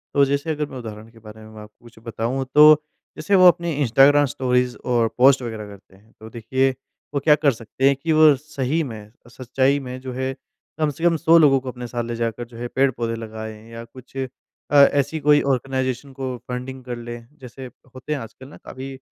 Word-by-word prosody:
तो 140 - +5
जैसे 140 +3 -2
अगर 150 -1 -2
मैं 130 - -9
उदाहरण 110 -2 -9
के 115 - -18
बारे 110 0 -13
में 110 - -13
मैं 110 - -11
आपको 105 +3 -16
कुछ 115 -1 -16
बताऊँ, 120 +4 -3
तो 150 +1 +8 0.4
जैसे 180 +6 0
वो 185 -1 +7
अपनी 170 -1 +3
इंस्टाग्राम 140 +4 +5
स्टोरीज़ 125 -2 -1 0.2
और 115 -2 +2
पोस्ट 130 +1 +5
वग़ैरह 110 -3 -6
करते 100 -1 -15
हैं 105 +3 -24
तो 110 +1 -11
देखिए, 130 +4 0 0.4
वो 140 - 0
क्या 150 +1 +4
कर 150 -2 +2
सकते 120 +3 -2
हैं 140 - +3
कि 160 +4 -3
वो 155 -2 +6
सही 150 +2 -3
में, 110 -5 -9 0.2
सच्चाई 130 +3 0
में 130 -1 -7
जो 130 -1 -7
है, 130 +1 -3 0.5
कम 155 - +1
से 145 +3 -8
कम 175 -1 +3
100 165 +1 +4
लोगों 140 -4 +5
को 130 0 -7
अपने 125 -1 -8
साथ 120 0 -4
ले 120 0 -5
जाकर 115 +1 -3
जो 115 -1 -14
है, 120 +1 -5
पेड़-पौधे 120 -3 -1
लगाएँ, 110 0 -9
या 115 0 -8
कुछ 130 +2 -15 0.5
अ, - - +1 0.2
ऐसी 145 +3 0
कोई 150 0 +4
आर्गेनाइज़ेशन 130 +1 -2
को 130 -2 -4
फंडिंग 130 +1 -6
कर 125 -1 -6
लें, 120 0 -9
जैसे 130 0 -10 0.3
होते 130 +4 -5
हैं 145 - -3
आजकल 130 +3 -11
ना, - - -14
काफ़ी 135 +1 -9
अ, - - -15
130 Hz, 215 wpm, -21 LUFS, 115-140 Hz, 0.5 s, तो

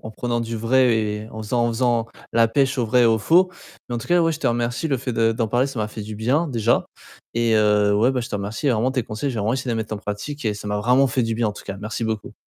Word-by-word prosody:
en - - -6
prenant 120 +1 -2
du 115 0 -4
vrai 120 +2 +3
et 105 0 -2
en 110 0 -7
faisant 120 +3 0
en - - +1
faisant 115 -1 +1 0.3
la 115 0 +4
pêche 135 +2 +1
au 120 - +1
vrai 125 +2 +4
et - - +5
au 110 -1 +3
faux. 180 - +4 0.4
Mais 120 - -3
en - - -2
tout - - -8
cas 175 0 +3
ouais, 165 0 +3
je 155 - -5
te - - 0
remercie. 120 +3 0
Le 135 -3 0
fait 125 -1 -4
de 115 0 +2
d'en 115 -1 -1
parler, 125 +4 +2
ça 135 -4 -6
m'a 105 - -1
fait 110 0 -7
du 110 +1 -7
bien 135 +10 +1
déjà 115 -2 +1 0.5
et 115 -1 +2
heu, 105 -1 +3
ouais, 120 +5 +3
bah, 125 - -1
je 120 - -5
te - - -5
remercie, 105 +8 -3
vraiment 125 +2 +1
tes 130 -3 0
conseils, 110 +6 -3
je - - -6
vais 110 - -2
vraiment 110 +4 +1
essayer 130 -1 -4
de - - 0
les 110 - -1
mettre 110 0 -6
en - - -4
pratique 105 +8 -6
et 105 -1 0
ça 105 0 -7
m'a 105 - -1
vraiment 125 +6 +3
fait 125 +1 0
du 115 0 -1
bien 115 -1 0
en - - -3
tout - - -12
cas, 100 0 -6
merci 110 +2 -4
beaucoup. 110 -2 -3
115 Hz, 320 wpm, -22 LUFS, 110-125 Hz, 0.5 s, et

